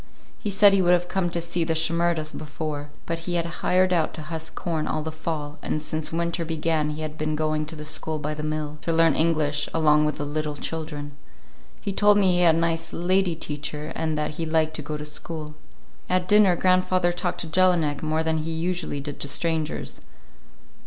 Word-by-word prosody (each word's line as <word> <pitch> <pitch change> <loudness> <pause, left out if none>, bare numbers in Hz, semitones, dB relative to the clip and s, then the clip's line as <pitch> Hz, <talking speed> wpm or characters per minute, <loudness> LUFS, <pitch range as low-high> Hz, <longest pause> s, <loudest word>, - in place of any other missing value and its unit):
He 210 - -3
said 200 0 +6
he 195 - +4
would 175 0 +4
have 175 0 +2
come 185 -1 0
to 170 - -1
see 170 0 -1
the 160 0 0
Shimerdas 165 -1 +1
before, 150 -1 -5 0.2
but 165 0 -2
he 175 - 0
had 170 -1 +1 0.2
hired 185 0 +3
out 165 -3 +1
to 155 - -6
husk 160 +1 -5
corn 160 -3 -2
all 155 - -1
the 160 - -4
fall, 155 -2 -4
and - - -1
since 155 0 -2
winter 170 +1 -1
began 160 -1 0
he 150 +1 -4
had 155 0 -6
been 155 0 -1
going 155 0 0
to 160 - -7
the 150 0 -7
school 155 +1 -3
by 150 0 -3
the 150 - -5
mill, 155 0 -3
to 165 - -1
learn 165 -1 +4
English, 155 -2 +1
along 150 -1 +4
with 150 - -1
the 145 - -3
little 150 0 -2
children. 150 -1 -4 0.7
He 200 - -3
told 205 +1 +5
me 195 -2 +4
he 175 - +2
had 170 -2 +5
a - - 0
nice 165 0 0
"lady 185 0 +1
teacher" 150 -1 -5
and 160 -1 -1
that 150 - -1
he 165 +2 -4
liked 160 0 +1
to - - -4
go 150 +1 -4
to 150 - -6
school. 150 0 -4 0.6
At 185 0 +1
dinner 205 -3 +6
grandfather 185 0 +3
talked 175 0 -2
to 165 - -4
Jelinek 165 -4 +2
more 155 +1 0
than 160 0 +1
he 155 +1 -3
usually 165 -2 -2
did 145 0 -6
to - - -2
strangers. 160 +2 -2
160 Hz, 215 wpm, -25 LUFS, 150-170 Hz, 0.7 s, said